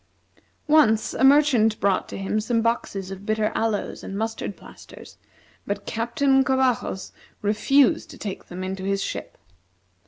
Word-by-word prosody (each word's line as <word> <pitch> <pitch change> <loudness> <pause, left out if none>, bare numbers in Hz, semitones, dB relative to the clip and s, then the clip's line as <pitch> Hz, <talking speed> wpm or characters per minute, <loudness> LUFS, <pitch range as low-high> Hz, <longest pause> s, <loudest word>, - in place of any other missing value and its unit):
Once 280 -8 +4
a - - -1
merchant 265 -6 +4
brought 195 -1 +1
to - - -6
him 195 +2 -1
some 230 +1 0
boxes 200 -5 -2
of 195 0 -8
bitter 215 0 0
aloes, 220 -2 -2
and 195 - -6
mustard 220 -2 -4
plasters, - - -14 0.5
but 200 0 -3
Captain 265 +4 +1
Covajos 260 -7 0 0.3
refused 220 +6 +3
to - - -11
take 200 -3 -6
them 180 +1 -7
into 190 0 -4
his 195 0 -1
ship. - - -6
220 Hz, 145 wpm, -24 LUFS, 200-255 Hz, 0.5 s, Once